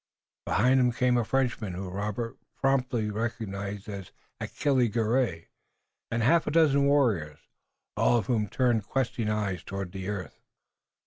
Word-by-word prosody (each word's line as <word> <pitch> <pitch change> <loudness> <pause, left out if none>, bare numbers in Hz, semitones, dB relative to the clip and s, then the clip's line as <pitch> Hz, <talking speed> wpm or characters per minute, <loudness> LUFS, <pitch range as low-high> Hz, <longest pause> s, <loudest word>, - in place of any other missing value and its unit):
Behind 125 +6 +4
him 125 -1 +3
came 125 +1 +2
a 120 - +2
Frenchman 120 -5 -1
whom 90 0 -5
Robert 105 +4 -3 0.2
promptly 125 -5 +1
recognized 105 -3 -4
as 100 -3 -7 0.3
Achille 130 -4 +1
Garay, 110 -5 0 0.6
and 115 0 0
a - - +2
half 165 +5 +4
dozen 145 -3 +4
warriors, 110 - +1 0.5
all 120 - +3
of 115 - -1
whom 110 -5 +1
turned 120 -4 +1
questing 120 -4 -1
eyes 100 -5 -1
toward 100 -2 -5
the 95 0 -5
earth. 95 -7 -5
115 Hz, 140 wpm, -28 LUFS, 100-125 Hz, 0.6 s, Behind